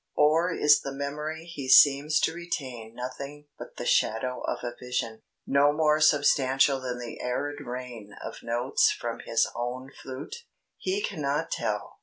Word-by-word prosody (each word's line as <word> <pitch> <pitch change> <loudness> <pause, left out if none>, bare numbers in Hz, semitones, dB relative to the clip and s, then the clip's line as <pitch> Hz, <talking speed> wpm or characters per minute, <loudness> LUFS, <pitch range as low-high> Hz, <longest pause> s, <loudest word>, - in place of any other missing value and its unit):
Or 160 +4 +3
is 150 -3 +4
the 140 - -5
memory 150 +3 -4
he 145 -6 -7
seems 145 +3 +6
to - - +1
retain 130 -10 -6
nothing 140 +4 -7
but - - -10
the - - -5
shadow 125 +3 +1
of - - -1
a 120 - -3
vision, 115 -3 -3 0.2
no 140 +1 +4
more 155 0 +2
substantial 135 -3 +4
than 125 -1 -4
the 120 -1 -7
'arid 145 +4 -2
rain' 120 -5 -7
of - - -8
notes 120 +3 +2
from 115 -1 -4
his 115 - +1
own 125 +3 -4
flute? 135 - -8 0.4
He 395 +2 -1
cannot - - -2
tell. - - -3
135 Hz, 155 wpm, -27 LUFS, 125-150 Hz, 0.4 s, seems